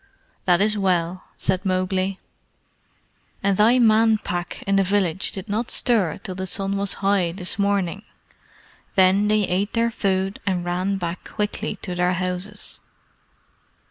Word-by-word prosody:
"That 180 0 +4
is 210 +1 +2
well," 185 -2 0
said 185 0 0
Mowgli. 185 0 0 1.2
"And 200 0 +2
thy 225 +5 +5
Man 225 -2 +5
Pack 175 -4 -5
in 195 - +1
the 195 - +4
village 190 -2 0
did 190 +2 -6
not 220 +3 -2
stir 210 - +2
till 185 - -6
the 190 +1 -4
sun 195 +1 0
was 200 0 +1
high 190 -4 +2
this 180 +1 -4
morning. 200 -2 0 0.9
Then 190 +2 +4
they 215 0 +3
ate 195 +2 -1
their 230 0 +1
food 195 -2 -1
and 180 -3 -1
ran 185 +3 -1
back 175 -1 -4
quickly 210 0 -2
to 180 - -4
their 180 0 +1
houses." 185 +3 -3
195 Hz, 145 wpm, -23 LUFS, 180-205 Hz, 1.2 s, thy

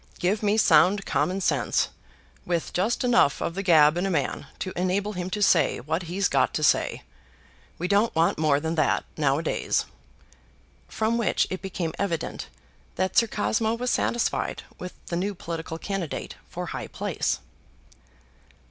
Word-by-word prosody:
Give 195 +4 0
me 210 0 +2
sound 190 +1 +5
common 190 +2 0
sense, - - +1 0.5
with 170 -2 -2
just 210 +9 0
enough 245 - +4
of - - -2
the 195 - -3
gab 160 -4 +5
in 185 +2 0
a - - -1
man 145 -4 -1
to 185 - -4
enable 195 +3 0
him 180 -1 -4
to 205 +3 -1
say 165 -7 +3
what 155 +7 -2
he's 190 +1 +1
got - - +1
to - - -1
say! - - +2 0.7
We 180 - -2
don't 205 +2 +2
want 165 -1 +2
more 150 -3 +3
than 160 +2 -2
that 155 -2 +1
nowadays." 150 +2 0 1.0
From 225 +2 0
which 215 -6 +2
it 185 - -3
became 180 -4 -3
evident 170 -6 -2 0.5
that 185 0 -1
Sir 230 - +5
Cosmo 220 +1 0
was 250 +1 -1
satisfied 235 - 0 0.2
with 180 0 -6
the 170 - -4
new 195 +3 -1
political 165 -1 -5
candidate 190 -3 -4 0.2
for - - -5
high - - -5
place. - - -2
185 Hz, 155 wpm, -26 LUFS, 165-205 Hz, 1.0 s, sound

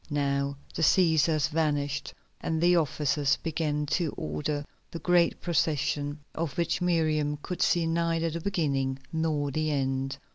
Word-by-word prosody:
Now 140 -1 0 0.2
the - - -4
Cæsars 160 -3 +4
vanished 145 -2 -1 0.3
and 160 -1 -1
the 175 +2 +4
officers 145 -3 +1
began 155 -2 -1
to 170 -5 -1
order 75 - -3 0.2
the - - -6
great 170 +1 +2
procession, 150 -3 0
of 160 -4 -3
which 170 +1 0
Miriam 155 -4 +1
could 180 -1 -4
see 170 -1 +3
neither 165 0 0
the 170 +1 -4
beginning 140 -8 0 0.2
nor 155 -3 0
the 155 +2 -1
end. 135 -1 -1
155 Hz, 140 wpm, -28 LUFS, 145-165 Hz, 0.3 s, Cæsars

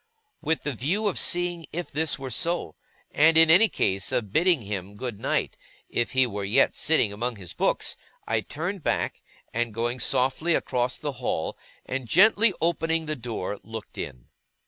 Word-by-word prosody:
With 160 +1 -1
the 145 - -2
view 165 - -1
of 200 - 0
seeing 175 -2 0
if 175 +2 -5
this 155 0 +1
were 135 -1 -6
so, 170 - -1 0.4
and, 160 +2 +5
in 165 0 +8
any 205 +6 +7
case, 95 0 0
of 105 -4 -2
bidding 170 -5 +3
him 100 -1 -5
good 120 -2 -5
night, - - -1 0.3
if 120 - -1
he 130 0 +4
were 105 -4 -4
yet 105 +8 +3
sitting 135 -10 +2
among 120 +4 -3
his 95 -4 -9
books, - - 0 0.3
I 115 -1 +1
turned 175 - -5
back, - - -1 0.3
and 120 -1 -2
going 120 +2 -1
softly 135 +7 +1
across 125 0 -1
the 150 - -3
hall, 80 -9 -2 0.3
and 130 -2 -4
gently 210 - +5
opening 165 -1 +1
the 155 0 -2
door, 115 -6 -5
looked 110 -1 -9
in. - - -7
130 Hz, 170 wpm, -26 LUFS, 110-165 Hz, 0.4 s, in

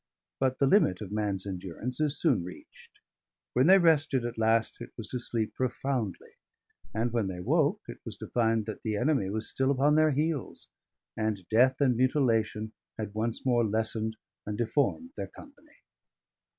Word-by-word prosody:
But 130 -1 +1
the 140 - +3
limit 135 - +4
of 100 -2 -6
man's 105 -2 -1
endurance 95 - -5
is 150 -1 +1
soon 135 - +2
reached; 90 +1 -12 0.6
when 125 +5 +4
they 190 +1 +8
rested 155 -7 +3
at 120 0 -4
last 115 0 +2
it - - -7
was 110 -2 -7
to 125 - -3
sleep 115 -2 -2
profoundly; 125 -5 -2 0.6
and 115 +2 -1
when 115 -4 +1
they 90 -2 -5
woke, 90 - +2
it - - -8
was - - -7
to - - -7
find 115 -2 +1
that 110 - -6
the 110 -2 -2
enemy 125 -4 +1
was 110 +2 -2
still 135 0 +1
upon 140 +2 +3
their 155 0 +5
heels, 150 -1 -2 0.5
and 110 -5 -2
death 125 +4 +5
and 130 -3 +4
mutilation 115 -4 +1 0.3
had 105 -2 -5
once 110 +3 -2
more 120 -2 +3
lessened 110 0 -1 0.3
and 105 0 -4
deformed 145 - 0
their - - -4
company. 290 +1 -16
115 Hz, 170 wpm, -29 LUFS, 110-135 Hz, 0.6 s, they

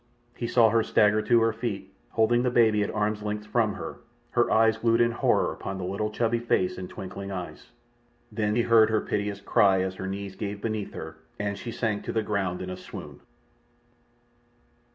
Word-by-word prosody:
He 120 - -3
saw 115 -1 +5
her 115 - +4
stagger 105 0 +3
to 115 +2 +3
her 115 0 +2
feet, 105 -4 -5 0.2
holding 120 +2 +2
the 125 - +1
baby 110 -3 +4
at 105 - 0
arm's 105 0 -1
length 105 0 -4
from 110 -3 +1
her, - - -7 0.3
her - - +2
eyes 110 0 +4
glued 115 0 +3
in 120 0 +4
horror 115 - +1
upon 95 - -6
the 95 - -5
little 100 +4 -2
chubby 115 +2 0
face 105 -6 0
and 90 - -6
twinkling 100 +1 -7
eyes. 90 -2 -7 0.6
Then 105 -1 0
he 120 - +3
heard 115 -2 +5
her 110 -1 +1
piteous 105 -1 -2
cry 95 -1 +3
as 95 0 -2
her 95 - -4
knees 100 0 -5
gave 100 0 -4
beneath 110 -1 -3
her, 80 0 -7 0.2
and 100 0 -2
she 115 - -7
sank 110 -3 -2
to - - -2
the 110 - 0
ground 95 -4 -2
in 90 - -5
a 90 - -6
swoon. 90 - -9
105 Hz, 195 wpm, -27 LUFS, 100-115 Hz, 0.6 s, saw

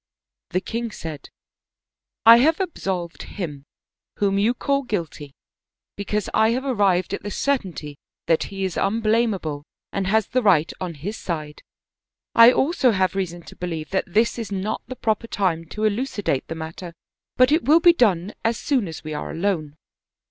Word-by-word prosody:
The 185 - 0
king 230 +3 -3
said: 160 -8 -8 0.5
" - - -68
I 230 +1 +10
have 315 +8 +3
absolved 190 - -3
him, 150 -8 -6 0.5
whom 200 -1 +1
you 225 +5 +2
call 275 +2 0
guilty, 165 - -5 0.6
because 205 0 -2
I 220 0 +4
have 260 +3 -2
arrived 200 -7 +1
at - - -3
the 205 - -5
certainty* 185 - -2 0.3
that 165 - +2
he 195 -1 -5
is 185 - -4
unblamable 215 -8 0 0.3
and 195 -1 -1
has 220 +1 +2
the 255 - 0
right 175 -8 +3
on 175 -3 -4
his 195 +10 -5
side. 155 -4 -5 0.7
I 230 +1 +9
also 270 0 +2
have 185 -2 +1
reason 175 -3 -3
to - - -13
believe 165 -3 -5
that 190 -1 -1
this 225 +4 +2
is 225 -3 -5
not 200 +2 -2
the 255 - -6
proper 225 -1 -1
time 175 -7 -1
to 215 - -8
eluci 215 +1 -1
date 135 -7 0
the 165 - -5
matter, 165 +2 -7 0.4
but 255 +2 +5
it 315 +3 +2
will 310 +4 +6
be 345 +1 +7
done 200 - +2
as 225 +1 +1
soon 260 -9 0
as 160 - -8
we 155 0 -5
are - - -4
alone." 165 -5 -2
195 Hz, 175 wpm, -23 LUFS, 170-230 Hz, 0.7 s, I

